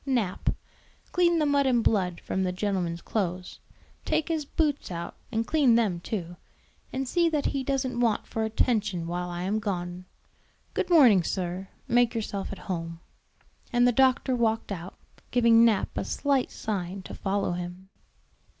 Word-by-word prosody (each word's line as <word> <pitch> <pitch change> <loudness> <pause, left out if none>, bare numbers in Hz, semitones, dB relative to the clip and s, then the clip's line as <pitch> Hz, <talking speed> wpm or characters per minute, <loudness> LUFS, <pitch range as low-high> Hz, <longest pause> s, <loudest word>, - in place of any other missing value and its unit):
Nap, 240 -9 0 0.6
clean 345 -1 +3
the 310 - +2
mud 285 -1 +3
and 240 -3 +3
blood 180 -5 +1
from 190 - -2
the 185 -1 0
gentleman's 180 -3 -2
clothes; 180 -4 -3 0.4
take 315 - 0
his 315 -3 -1
boots 295 -1 -1
out 170 -1 -5 0.2
and 225 +1 0
clean 275 -6 +4
them 210 -7 +2
too; 175 -2 -5 0.5
and 265 0 -3
see 340 +5 +2
that 300 -3 -1
he 275 -1 0
doesn't 260 -2 -1
want 230 -4 +1
for 225 - -3
attention 215 -5 0
while 175 +1 -3
I 175 0 -4
am 205 +4 0
gone. 180 -3 -4 0.7
Good - - -1
morning, 255 - +7
sir; 180 +2 -3 0.2
make 240 0 +3
yourself 205 -3 -3
at 200 - -6
home." 165 -3 -4 0.7
And 245 0 +4
the - - +5
doctor 260 +1 +3
walked 225 -3 0
out, 180 -1 -6 0.3
giving 235 -1 +5
Nap 225 -4 +2
a - - -1
slight 275 -3 0
sign 190 -2 -4
to - - -9
follow 200 -1 -1
him. 180 +2 -6
215 Hz, 160 wpm, -27 LUFS, 180-255 Hz, 0.7 s, morning